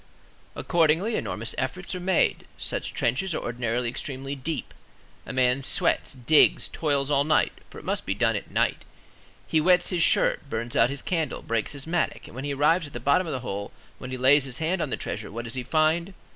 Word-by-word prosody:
Accordingly, 170 +6 +2
enormous 115 +1 -3
efforts 180 +10 -3
are 180 - -3
made. 180 0 +1
Such - - -3
trenches 155 +9 0
are - - -3
ordinarily 120 0 -2
extremely 135 +3 -5
deep; 150 +4 -4 0.5
a - - -4
man 130 +1 +2
sweats, 135 - +1
digs, 135 +4 +4
toils 145 -2 -1
all 140 -1 +4
night—for 155 +1 0
it - - -11
must - - -2
be 95 - 0
done 115 +1 +2
at 105 - -5
night; - - 0 0.6
he 160 - +2
wets 180 +2 +4
his 180 -3 0
shirt, 145 - +3
burns 115 0 -3
out 115 - +5
his 140 0 -5
candle, 165 -4 -2
breaks 115 +1 -1
his 140 -2 -6
mattock, 165 +1 -1
and - - -12
when 130 +3 -5
he 145 - -2
arrives 155 +4 +3
at 145 - -14
the 120 - -4
bottom 140 +8 +2
of 155 - -3
the 130 - -3
hole, 100 -4 -5 0.3
when 125 - -7
he 130 - -4
lays 135 +2 +5
his 125 -2 -6
hand 170 +3 0
on - - -1
the - - -2
"treasure," - - -5
what 115 +3 -5
does 115 - -5
he 130 - -2
find? 160 +7 +1
140 Hz, 210 wpm, -26 LUFS, 125-160 Hz, 0.6 s, out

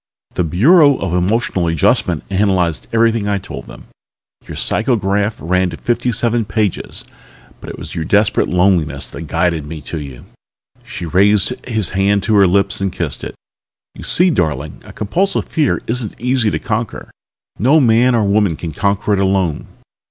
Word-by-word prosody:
"The 90 - 0
Bureau 140 - +4
of 90 -3 -3
Emotional 90 -1 0
Adjustment 80 -2 +1
analyzed 95 -4 0
everything 115 -2 +2
I 100 -1 +1
told 95 - -8
them. - - -12 0.6
Your - - -7
psycho 120 +4 +1
graph 100 +1 0
ran 90 +3 0
to - - -8
fifty 120 +1 -1
seven 115 0 0
pages, 105 -2 -3 0.6
but - - -10
it - - -8
was - - -8
your 80 - -3
desperate 105 +5 +2
loneliness 85 -6 +1
which 85 - -7
guided 85 -2 -1
me 80 +1 -7
to 80 - -6
you." 70 -4 -9 0.6
She 90 - -7
raised 100 +4 +3 0.2
his 110 -7 0
hand 100 +1 +1
to 110 0 +1
her 100 -1 +6
lips 100 +2 +1
and 95 -1 -1
kissed - - -4
it. - - -6 0.6
"You - - -11
see, 180 +1 +3
darling, 75 - -2
a - - -12
compulsive 175 - -1
fear 155 -5 0
isn't 115 -2 -3
easy 125 -2 +1
to - - -1
conquer. 115 +2 -4 0.5
No 135 +9 +4
man 120 -1 +3
or 115 - +2
woman 100 -3 +2
can 80 +1 -6
conquer 100 +3 0
it 100 - +1
alone. 95 -5 0
100 Hz, 170 wpm, -16 LUFS, 90-115 Hz, 0.6 s, her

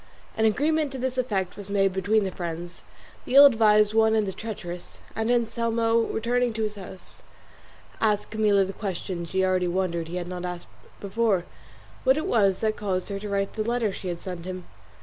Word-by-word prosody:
An 220 - +2
agreement 295 +6 +1
to - - -4
this 255 0 -2
effect 195 -7 -1
was 205 -1 -9
made 195 -1 +2
between 200 +3 +2
the 190 - -2
friends, 175 0 -6 0.4
the 255 - -3
ill 280 +1 +11
advised 215 -4 +5
one 220 0 +4
and 215 -2 +1
the 190 - -3
treacherous, 180 -6 -7 0.2
and 225 +1 -1
Anselmo 230 -1 +1
returning 240 +1 0
to 220 0 -2
his 210 -1 -2
house 190 -3 -11 0.8
asked 210 -2 +1
Camilla 210 -3 +3
the 195 - -6
question 185 -3 -4
she 190 +2 0
already 185 -1 +1
wondered 175 -2 -1
he 170 - -6
had 175 -1 -3
not 180 0 -5
asked 180 -1 -5 0.3
before 200 -2 0 0.6
what 265 +2 +4
it 310 - -2
was 200 -5 +2
that 220 - +2
had 215 - -2
caused 185 -2 -2
her 200 -1 -3
to 205 +1 -6
write 195 0 -1
the 215 - -2
letter 235 -2 0
she 190 - -7
had 175 -1 -3
sent 180 -2 -7
him. 185 -1 -5
205 Hz, 200 wpm, -26 LUFS, 185-225 Hz, 0.8 s, ill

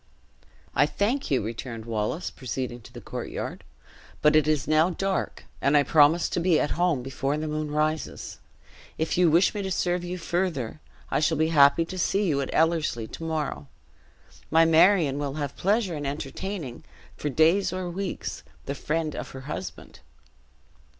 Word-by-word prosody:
"I 145 - +4
thank 210 - -1
you," 130 -6 +1
returned 115 +1 -6
Wallace, 115 +9 -2
proceeding 125 -2 -5
to - - -14
the - - -10
courtyard; - - -5 0.6
"but 150 0 +5
it 155 -1 +4
is 155 -4 +1
now 155 +3 +4
dark, 190 +2 -2 0.2
and 140 +2 +4
I 145 - +5
promised 155 +3 +4
to - - +1
be 170 -2 +3
at - - 0
home 170 -6 +1
before 135 +2 -2
the 155 +1 -3
moon 155 0 -2
rises. 155 +1 -2 0.6
If 160 - -1
you 180 -1 +4
wish 170 +4 +4
me 210 - -3
to 190 - -3
serve 180 -1 0
you 180 +1 -4
further, 170 -8 -2 0.3
I - - +2
shall 155 +1 +2
be 160 +1 +2
happy 145 +1 +5
to 185 +2 -6
see 200 +3 +1
you 140 -4 +1
at 135 - -3
Ellerslie 160 -9 +1
to - - -8
morrow. 150 - -3 0.8
My 165 +1 +5
Marion 165 -3 +4
will 140 -1 -3
have 145 -2 -4
pleasure 200 -1 +1
in 145 -2 -3
entertaining, 150 +1 -5 0.3
for 150 - -3
days 165 +7 +3
or 185 0 -3
weeks, 185 +2 -4 0.2
the 140 - -3
friend 155 +1 -2
of - - -5
her - - -7
husband." 95 - -7
155 Hz, 170 wpm, -26 LUFS, 140-175 Hz, 0.8 s, but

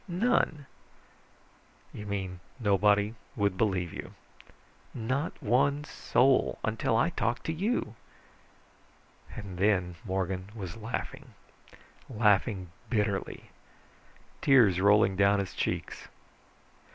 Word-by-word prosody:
"None." 175 - +1 1.3
"You 105 - -8
mean 95 -3 -4 0.2
nobody 105 0 +3 0.2
would 100 -4 +1
believe 95 -4 0
you?" - - -8 0.8
"Not 130 +7 -2
one 140 +6 +2
soul. 135 -3 +2
Until 110 +1 0
I 160 +8 +2
talked 120 -4 -1
to 160 - -1
you." 185 - -1 1.4
And 95 -4 -8
then 95 -3 +2
Morgan 95 -1 -3
was 95 -3 -6
laughing, 115 +1 -6 0.7
laughing 105 -5 +1 0.2
bitterly, 105 -4 -2 0.9
tears 110 -10 +5
rolling 100 -1 +4
down 100 +1 +4
his 100 -2 -3
cheeks. - - -3
105 Hz, 95 wpm, -29 LUFS, 95-125 Hz, 1.4 s, tears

